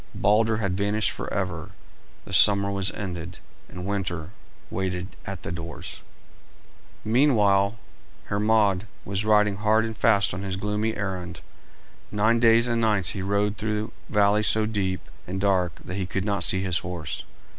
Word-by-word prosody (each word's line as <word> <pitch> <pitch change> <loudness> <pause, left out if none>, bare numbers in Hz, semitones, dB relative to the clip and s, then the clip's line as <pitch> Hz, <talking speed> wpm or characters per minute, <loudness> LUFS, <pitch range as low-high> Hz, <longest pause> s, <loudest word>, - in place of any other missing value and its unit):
Balder 110 +2 +3
had 100 -4 -1
vanished 105 +2 0
forever, 90 -5 -4 0.5
the - - -9
summer 100 -1 +5
was 95 -1 +1
ended, 90 -3 -6 0.3
and 90 0 -7
winter 90 -5 -3 0.4
waited 95 -1 -2 0.2
at - - -6
the - - -4
doors. 85 -2 -7 1.0
Meanwhile 110 -4 +3 0.5
Hermod 105 -1 +2 0.2
was 100 +1 -1
riding 105 -2 +3
hard 110 +2 +3
and 110 0 -5
fast 100 -5 +3
on 90 - -4
his 95 -1 -3
gloomy 105 +2 -1
errand. 90 -3 -4 0.7
Nine 110 +3 +2
days 115 0 +5
and 115 -1 0
nights 105 -5 +2
he 95 - -3
rode 100 +2 0
through 105 0 -2 0.2
valleys 105 0 +3
so 110 0 +3
deep 95 -4 -1 0.3
and 95 +2 -3
dark 95 -4 +1
that - - -6
he 95 -2 -2
could 95 +1 -2
not 100 -1 0
see 95 - +2
his 90 -2 +2
horse. 90 -4 -5
100 Hz, 150 wpm, -25 LUFS, 95-110 Hz, 1.0 s, summer